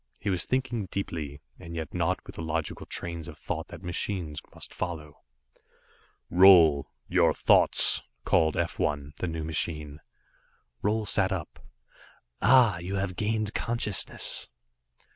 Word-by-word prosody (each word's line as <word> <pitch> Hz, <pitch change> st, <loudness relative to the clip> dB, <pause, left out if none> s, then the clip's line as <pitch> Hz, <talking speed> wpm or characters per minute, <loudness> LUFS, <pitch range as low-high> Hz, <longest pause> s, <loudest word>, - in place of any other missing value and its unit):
He 100 Hz, -, -1 dB
was 90 Hz, -2 st, +2 dB
thinking 125 Hz, -6 st, -1 dB
deeply, 75 Hz, -8 st, -5 dB, 0.2 s
and 85 Hz, 0 st, -9 dB
yet 80 Hz, -3 st, -5 dB
not -, -, -1 dB
with -, -, -10 dB
the -, -, -7 dB
logical 80 Hz, -1 st, -3 dB
trains 85 Hz, -2 st, -5 dB
of -, -, -10 dB
thought -, -, -4 dB
that 85 Hz, -, -11 dB
machines 85 Hz, -3 st, -3 dB
must -, -, -8 dB
follow. 80 Hz, -5 st, -6 dB, 1.1 s
"Roal 85 Hz, -6 st, +7 dB, 0.2 s
your -, -, +3 dB
thoughts," -, -, +4 dB, 0.2 s
called 80 Hz, -1 st, +2 dB
F 85 Hz, 0 st, -2 dB
1, 70 Hz, -1 st, -1 dB
the 90 Hz, -, -3 dB
new 80 Hz, -1 st, -4 dB
machine. 75 Hz, -2 st, -3 dB, 0.8 s
Roal 110 Hz, +1 st, +1 dB
sat 95 Hz, -2 st, +3 dB
up. 90 Hz, -5 st, -5 dB, 0.8 s
"Ah 120 Hz, -8 st, +5 dB
you 90 Hz, +3 st, -4 dB
have 95 Hz, -2 st, -2 dB
gained 110 Hz, +1 st, -1 dB
consciousness." 115 Hz, -4 st, -1 dB
85 Hz, 135 wpm, -28 LUFS, 80-100 Hz, 1.1 s, Roal